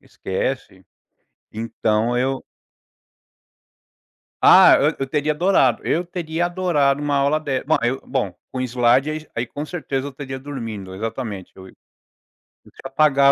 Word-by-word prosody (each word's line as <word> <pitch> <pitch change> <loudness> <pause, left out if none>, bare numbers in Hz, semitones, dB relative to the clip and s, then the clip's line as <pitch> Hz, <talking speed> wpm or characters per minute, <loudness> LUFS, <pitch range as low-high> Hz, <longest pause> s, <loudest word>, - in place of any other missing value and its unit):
Esquece. 95 -1 -4 0.7
Então 115 +1 -1
eu 130 +2 -1 2.0
Ah, - - +8
eu - - +2
eu 135 - -2
teria 150 +2 0
adorado, 150 - +2
eu 175 +2 0
teria 170 -1 -2
adorado 170 -6 +1
uma 145 -1 0
aula 140 +2 +2
de 140 -4 -2
ma 155 - +3
eu 125 +3 0
bom, 125 -9 -2 0.2
com 130 - -3
slide, 125 +3 +2
aí 155 0 -5
aí 120 +1 -2
com 145 +5 -6
certeza 145 -5 -3
eu - - -6
estaria 135 -1 -7
dormindo, 115 -9 -6
exatamente 110 -1 -5
eu 95 0 -12
e - - -17 0.9
deixa - - -17
eu - - -4
apagar 140 -1 +5
135 Hz, 145 wpm, -21 LUFS, 120-150 Hz, 2.0 s, Ah